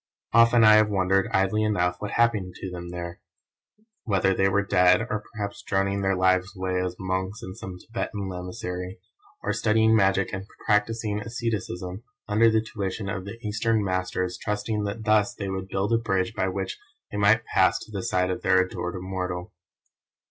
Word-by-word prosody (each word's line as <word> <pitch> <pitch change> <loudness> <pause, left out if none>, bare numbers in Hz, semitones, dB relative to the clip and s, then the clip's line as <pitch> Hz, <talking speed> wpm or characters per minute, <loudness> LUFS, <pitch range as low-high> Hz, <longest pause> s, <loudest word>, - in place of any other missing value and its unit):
Often 115 0 +6
I 110 -1 +8
have 110 0 +4
wondered, 95 -1 +2
idly 95 +3 +2
enough, 90 -5 +1
what 105 - -4
happened 105 -6 +1
to 95 - -6
them 85 -1 -7
there; 85 0 -6 0.8
whether 95 -3 +2
they 95 +1 +2
were 100 +1 +1
dead, 90 0 +4
or 110 -2 -3
perhaps 100 -3 -5
droning 100 0 0
their 95 0 +1
lives 95 +1 +2
away 95 0 -1
as 90 -1 -3
monks 95 +2 -3
in 95 - -6
some 95 -1 -8
Thibetan 105 -1 -4
Lamasery, 90 +1 -5 0.4
or - - 0
studying 110 0 +3
magic 95 -2 +2
and 95 +1 -5 0.2
practising 105 0 +1
asceticism 105 -4 -4 0.3
under 110 +2 +4
the 110 0 +3
tuition 100 -3 -4
of 95 -1 -4
the 100 +3 -7
Eastern 110 +1 +1
Masters 95 -1 -2
trusting 105 0 -2
that 105 +2 -4
thus 105 -1 +2
they 100 -1 -4
would 95 0 -4
build 100 +3 -1
a 115 - +4
bridge 95 -2 0
by 95 -3 0
which 95 0 -3 0.3
they 105 - -4
might 105 +3 +4
pass - - +3
to - - -11
the 100 -2 -3
side 95 -5 0
of - - -3
their 95 0 +4
adored 95 -1 -2
Immortal. 90 0 -4
100 Hz, 175 wpm, -26 LUFS, 95-110 Hz, 0.8 s, I